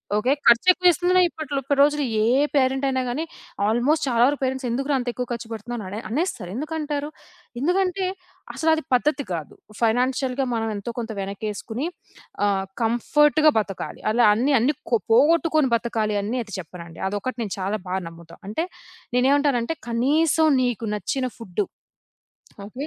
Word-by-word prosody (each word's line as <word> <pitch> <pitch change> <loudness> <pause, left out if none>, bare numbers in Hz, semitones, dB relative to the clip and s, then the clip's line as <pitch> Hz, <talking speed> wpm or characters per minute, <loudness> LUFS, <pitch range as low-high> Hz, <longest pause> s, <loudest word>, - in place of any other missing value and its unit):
Okay. 235 +6 +2 0.2
ఖర్చెక్కువ 360 +9 +5
వేసుకున్నా 355 +2 +4
ఇప్పటిలో 295 -4 -4
ఇప్పటి 280 +2 0
రోజుల్లో 295 0 +3 0.2
ఏ - - +2 0.3
పేరెంటైయినా 265 -1 +2
గాని, 270 +7 -2 0.4
ఆల్మోస్ట్ 240 +8 +2
చాలా 240 -1 +3
వరకు 285 +1 0
పేరెంట్స్, 260 0 -1
ఎందుకురా 275 +4 0
అంత 245 - -5
ఎక్కువ 250 +1 -4
ఖర్చు 235 -1 -4
పెడుతున్నావు, 225 0 -6
అడే 205 +3 -5
అనేస్తారు. 245 - -2
ఎందుకు 300 +5 -4
అంటారు? 295 -1 -3 0.5
ఎందుకంటే 370 +4 +1 0.5
అసలది 320 -1 +2
పద్ధతి 285 +3 +2
కాదు. 160 -3 -5 0.3
ఫైనాన్షియల్‌గా 255 +3 +1
మనం 225 -1 -1
ఎంతో 205 +4 -5
కొంత 225 -1 -4
వెనక్కేసుకొని, 215 +6 -4 0.6
ఆ - - +3 0.4
కంఫర్ట్‌గా 295 +7 +4
బతకాలి. 195 -3 -5
అలా 240 +2 +4
అన్ని, 265 +6 +1
అన్ని 275 +6 +1 0.2
కొ 235 - +4
పోగొట్టుకొని 310 +2 +4
బ్రతకాలి 225 -3 0
అని 235 +3 -2
చెప్పనండి. 170 -1 -10
అదొకటి 205 +6 -4
నేను 205 - -4
చాలా 200 +3 -1
బాగా 190 +1 -1
నమ్ముతా. 165 0 -14
అంటే 320 +11 -1 0.5
నేనేమంటానంటే, 275 +1 +2
కనీసం 310 +7 +3 0.2
నీకు 235 -2 -1
నచ్చిన 260 +5 -2
ఫుడ్డు, 200 -2 -2 1.0
ఓకే, 270 +7 -6
255 Hz, 140 wpm, -23 LUFS, 225-295 Hz, 1.0 s, ఖర్చెక్కువ